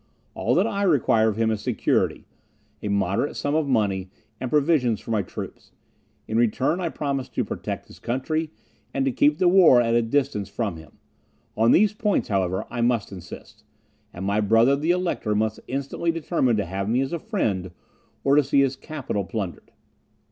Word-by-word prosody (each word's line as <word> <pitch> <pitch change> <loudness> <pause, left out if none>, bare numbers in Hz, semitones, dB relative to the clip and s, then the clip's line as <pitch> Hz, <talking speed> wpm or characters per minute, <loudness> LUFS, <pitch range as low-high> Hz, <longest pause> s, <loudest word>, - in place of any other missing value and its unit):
All - - 0
that - - +3
I 200 - -2
require 125 - +3
of 105 - -4
him 115 0 +2
is 110 -1 -2
security, - - 0 0.6
a - - -4
moderate 100 +5 0
sum 145 - -2
of 155 -1 +1
money, 100 -7 0 0.3
and 130 - -3
provisions 140 -6 +2
for - - -8
my 110 -2 +2
troops; 90 - -9 0.5
in 110 - -1
return, 130 - +1
I 170 - -1
promise 140 -4 -3
to - - -2
protect - - -5
his - - -16
country, 155 +6 -2 0.5
and 135 - +1
to 135 - +1
keep 145 +4 +3
the 180 - +3
war 175 -8 +7
at 115 -1 +1
a 120 - +4
distance 115 -4 -1
from 100 -4 -3
him. 80 -1 -14 0.6
On 115 +2 +4
these 210 +2 +4
points, 210 - 0
however, 95 -1 0
I 120 0 -2
must 120 -4 +1
insist; 90 -3 -11 0.5
and 90 +2 -6
my 100 +2 +1
brother, 115 +6 +4
the 150 +4 -2
Elector, 175 -12 0
must 110 +1 0
instantly 140 +5 -3
determine 160 -7 +1
to 100 - 0
have 95 +3 -3
me 120 +3 +2
as 135 +4 -3
a 170 - -2
friend, 105 - -2 0.5
or 140 0 +4
to 150 - +5
see 140 +1 +3
his 135 -1 +1
capital 135 -11 -4
plundered." 100 -3 -5
120 Hz, 185 wpm, -24 LUFS, 105-150 Hz, 0.6 s, war